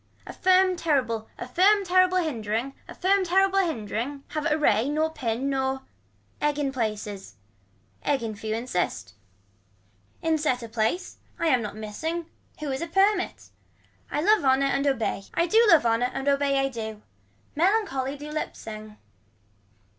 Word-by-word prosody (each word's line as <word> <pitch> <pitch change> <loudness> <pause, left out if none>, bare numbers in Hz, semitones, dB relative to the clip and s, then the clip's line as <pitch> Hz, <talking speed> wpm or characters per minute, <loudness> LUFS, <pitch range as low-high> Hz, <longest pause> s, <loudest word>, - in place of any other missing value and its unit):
A - - -8
firm 370 0 +4
terrible 250 -9 0
a - - -6
firm 390 +9 +4
terrible 370 0 +4
hindering, 240 - -2
a - - -10
firm 390 +1 +2
hindering 320 - 0
have 305 +1 -2
a 300 - +3
ray 280 -4 +2
nor 310 +2 0
pin 240 0 -2
nor. 265 -1 -1 0.6
Egg 295 -1 +1
in 285 -2 0
places. 210 -5 -4 0.7
Egg 275 -4 0
in 220 -2 -4
few 215 +1 -3
insists. 225 - -2 1.1
In 320 -1 +2
set 255 -5 0
a - - -6
place. 225 +11 -2 0.2
I 335 - +1
am 255 -5 +3
not 210 -1 -5
missing. 315 +11 -4 0.4
Who 295 -2 -2
is 265 - -3
a 335 - -3
permit. 385 +2 +1 0.6
I 295 - -1
love 425 +3 +4
honor 265 0 +3
and 275 +1 +1
obey 225 -7 -1
I 335 - +3
do 440 +6 +5
love 325 -9 +6
honor 230 +2 +2
and 270 - -4
obey 280 0 +2
I 270 0 +2
do. 220 -4 -6 0.5
Melancholy 310 -7 +1
do 295 +1 -8
lip 310 - -3
sing. 215 -1 -9
275 Hz, 155 wpm, -26 LUFS, 230-335 Hz, 1.1 s, love